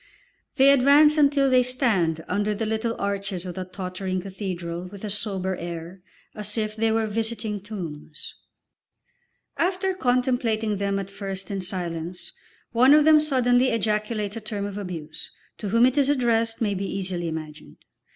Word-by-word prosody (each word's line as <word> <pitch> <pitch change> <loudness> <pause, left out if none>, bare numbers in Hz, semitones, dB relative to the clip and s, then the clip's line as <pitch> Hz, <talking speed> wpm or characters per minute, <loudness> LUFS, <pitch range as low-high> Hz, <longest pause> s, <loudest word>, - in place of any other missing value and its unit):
They 270 +1 +6
advance 285 +3 +6
until 285 -2 +4
they 255 -1 +5
stand 205 - +1
under 205 +2 0
the 220 +2 -2
little 220 +1 -1
arches 200 -2 -3
of 180 - -5
the 185 +1 -5
tottering 185 0 -4
cathedral 180 -3 -5
with 200 +2 -11
a 210 - -1
sober 190 -3 0
air, 170 +2 -7 0.3
as 210 +1 -2
if 215 -1 -1
they 225 0 +1
were 225 0 +1
visiting 220 -1 -3
tombs. 165 -7 -7 1.2
After 375 +2 0
contemplating 245 - 0
them 200 0 -1
at 195 0 -5
first 195 -1 -5
in 195 -1 -2
silence, 175 -1 -5 0.4
one 255 +5 +6
of 300 -1 +5
them 310 -1 +7
suddenly 255 -4 +3
ejaculates 215 -1 -1
a 225 - -5
term 210 -1 -4
of 205 0 -5
abuse 165 -5 -7 0.3
(to 205 - -4
whom 230 +4 +5
it 260 +3 +2
is 280 0 +3
addressed 230 -4 +1
may 210 -3 +1
be 195 0 -3
easily 185 -3 -3
imagined!) 155 - -7
210 Hz, 160 wpm, -25 LUFS, 185-240 Hz, 1.2 s, them